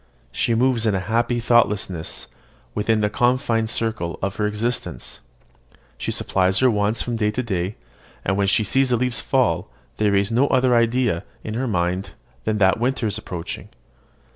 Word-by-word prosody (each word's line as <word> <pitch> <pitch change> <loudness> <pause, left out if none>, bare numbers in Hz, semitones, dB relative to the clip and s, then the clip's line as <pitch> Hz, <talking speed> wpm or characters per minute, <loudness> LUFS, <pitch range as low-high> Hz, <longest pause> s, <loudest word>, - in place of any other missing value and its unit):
She 115 - 0
moves 120 -1 +2
in 105 - +2
a - - +1
happy 115 +5 0
thoughtlessness 105 -8 +1 0.5
within 105 +1 +1
the 105 - +2
confined 120 -2 +1
circle 110 -7 -2
of 95 0 -2
her 105 - +1
existence; 105 - -3 0.8
she - - -4
supplies 95 0 +1
her 130 -1 +4
wants 105 +1 +1
from 120 -2 -2
day 105 -1 +1
to 120 +4 -2
day; 95 -3 -2 0.5
and, 95 - +1
when 100 0 +1
she 95 +3 +3
sees 135 +5 +2
the 120 - +3
leaves 125 0 0
fall, 105 -9 +1 0.3
they 105 -1 +2
raise 100 +1 +2
no 125 +5 +3
other 130 -2 +3
idea 115 -5 +2 0.2
in 110 - -4
her 125 +4 -1
mind 90 -2 -1 0.3
than 110 -1 +1
that 95 +1 +3
winter 125 0 0
is 105 0 -1
approaching. 90 -5 -6
110 Hz, 170 wpm, -22 LUFS, 100-120 Hz, 0.8 s, her